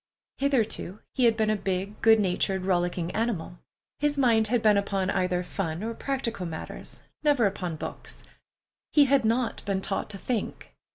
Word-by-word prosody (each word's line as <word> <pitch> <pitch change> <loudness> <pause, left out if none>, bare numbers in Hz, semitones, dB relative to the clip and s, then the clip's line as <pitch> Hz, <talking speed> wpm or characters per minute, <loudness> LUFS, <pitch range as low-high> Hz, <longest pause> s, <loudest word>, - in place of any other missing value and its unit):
Hitherto 230 -7 0
he 255 - +2
had 225 -1 +4
been 215 -1 +2
a - - +2
big, 195 +1 -3
good 225 -1 +6
natured, 190 0 +1
rollicking 175 -2 0
animal. 195 -6 -2 0.4
His 295 0 +1
mind 230 -5 +4
had 235 0 +1
been 215 -1 +6
upon 195 -1 0
either 180 -1 0
fun 175 -1 -3
or 230 +1 -2
practical 230 -7 -3
matters, 160 -1 -7 0.2
never 290 -6 +3
upon 185 -4 -2
books. - - -6 0.7
He 295 -2 +7
had 275 -1 +3
not 230 +2 0
been 195 -2 0
taught 195 +2 -2
to 205 - -3
think. 225 +1 -4
210 Hz, 165 wpm, -27 LUFS, 185-235 Hz, 0.7 s, He